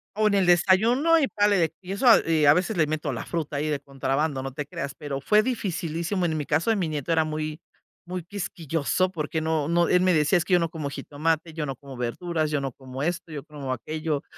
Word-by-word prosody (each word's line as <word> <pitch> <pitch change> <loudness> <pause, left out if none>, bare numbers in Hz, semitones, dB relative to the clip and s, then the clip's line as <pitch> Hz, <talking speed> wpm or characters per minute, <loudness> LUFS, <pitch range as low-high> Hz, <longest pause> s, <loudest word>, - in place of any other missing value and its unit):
O 215 0 +3
en 210 - +2
el 195 -2 +3
desayuno, 225 - +4
y 285 - +2
párale 205 -3 +2
de 165 -1 +1
y 185 +1 -8
eso, 200 +6 0 0.2
y 160 -2 +3
a 145 - +8
veces 180 +1 0
le 155 -3 +3
meto 155 -2 -2
la 115 - -5
fruta 155 -4 -3
ahí 150 +2 -1
de 150 -2 -1
contrabando, 135 +1 -2
no 135 - -5
te 145 +1 -4
creas, 145 -2 -5
pero 140 -2 -5
fue 210 +7 +4
dificilísimo. 180 -6 -2
En 160 -2 0
mi 150 - -3
caso 155 +9 +1
de 225 - +4
mi 180 -6 -1
nieto 150 +1 -3
era 160 -1 +3
muy, 155 0 -4 0.5
muy 180 -1 -4
quisquilloso 175 -1 -1
porque 160 -1 -3
no, 160 -2 0
no, 170 0 +2
él 180 - +4
me 185 0 +3
decía: 155 +3 +3
"Es 170 - -1
que 185 - -1
yo 180 - +6
no 165 -1 0
como 155 -4 -4
jitomate, 155 +3 -2
yo 155 -2 -3
no 135 - -4
como 135 -1 -11
verduras, 155 +6 -2
yo 145 -2 0
no 135 - -3
como 130 +2 -7
esto, 170 -1 -2
yo 145 -2 -6
como 145 -3 -6
aquello". 155 +3 -3
160 Hz, 240 wpm, -25 LUFS, 145-180 Hz, 0.5 s, a